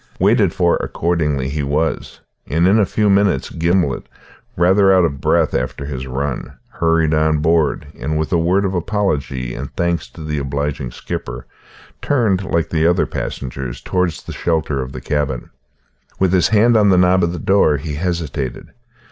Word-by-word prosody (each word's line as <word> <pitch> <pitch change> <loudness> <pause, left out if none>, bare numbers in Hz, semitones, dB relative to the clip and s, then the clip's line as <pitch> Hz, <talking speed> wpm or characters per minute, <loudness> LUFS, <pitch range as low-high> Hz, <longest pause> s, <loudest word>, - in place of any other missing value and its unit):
Waited 100 -1 +3
for 85 -1 +2
accordingly 75 -6 -1
he 75 +2 -2
was; 75 +3 -2 0.3
and 85 +4 +2
in 105 +4 +4
a 100 - +3
few 105 +2 +1
minutes 100 -7 +2
Gimblet, 85 -3 0 0.5
rather 95 +3 +4
out 95 -2 +5
of 70 -4 -3
breath - - +2
after 65 +2 -2
his 65 -2 -5
run, 65 0 -4 0.2
hurried 80 -2 +1
on 75 0 +2
board, 80 0 +1
and 75 +4 -3
with 80 +2 -2
a - - +4
word 90 +4 +2
of 95 - -1
apology 80 - -2
and 70 +3 -6
thanks 85 -1 -1
to 80 - -11
the 75 -1 -2
obliging 70 -1 -3
skipper - - -6 0.6
turned, 110 -9 +1
like 85 -3 -1
the 80 0 +2
other 90 +1 +2
passengers, 65 -2 -5
towards 90 -3 -1
the - - -8
shelter 80 -5 -1
of 65 0 -6
the 65 - -7
cabin. 70 -3 -2 0.7
With 95 -1 +1
his 90 - +4
hand 110 +3 +4
on 105 -2 +5
the 95 - +4
knob 90 0 +4
of 85 - +1
the 90 - -5
door 80 -3 +3
he 75 +2 -5
hesitated. 75 -5 -3
80 Hz, 175 wpm, -18 LUFS, 70-90 Hz, 0.7 s, out